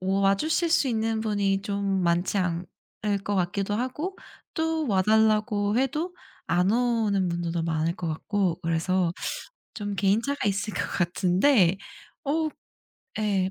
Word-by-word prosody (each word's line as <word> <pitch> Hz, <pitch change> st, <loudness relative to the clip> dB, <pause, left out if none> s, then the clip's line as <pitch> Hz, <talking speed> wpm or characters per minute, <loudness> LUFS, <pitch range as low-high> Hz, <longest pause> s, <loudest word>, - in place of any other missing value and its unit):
와 195 Hz, +1 st, +3 dB
주실 320 Hz, -, 0 dB
수 290 Hz, -5 st, +3 dB
있는 225 Hz, -1 st, 0 dB
분이 200 Hz, -3 st, 0 dB
좀 200 Hz, -2 st, -1 dB
많지 175 Hz, +3 st, +1 dB
않을 185 Hz, +3 st, -3 dB
것 205 Hz, -, -1 dB
같기도 195 Hz, +3 st, 0 dB
하고 260 Hz, -, -3 dB, 0.4 s
또 320 Hz, -1 st, 0 dB
와 190 Hz, -3 st, +3 dB
달라고 215 Hz, 0 st, +3 dB
해도 305 Hz, +7 st, -1 dB, 0.3 s
안 180 Hz, +3 st, +2 dB
오는 225 Hz, -6 st, +1 dB
분들도 170 Hz, -1 st, -2 dB
많을 165 Hz, 0 st, 0 dB
것 170 Hz, -, -3 dB
같고 185 Hz, +2 st, -1 dB
그래서 165 Hz, +2 st, +1 dB, 0.6 s
좀 205 Hz, -2 st, -4 dB
개인차가 210 Hz, +7 st, +1 dB
있을 200 Hz, +2 st, -2 dB
것 -, -, -1 dB
같은데 180 Hz, +3 st, +3 dB, 0.5 s
어 310 Hz, +2 st, +1 dB, 0.7 s
예 195 Hz, -3 st, +1 dB
200 Hz, 235 characters per minute, -26 LUFS, 185-225 Hz, 0.7 s, 와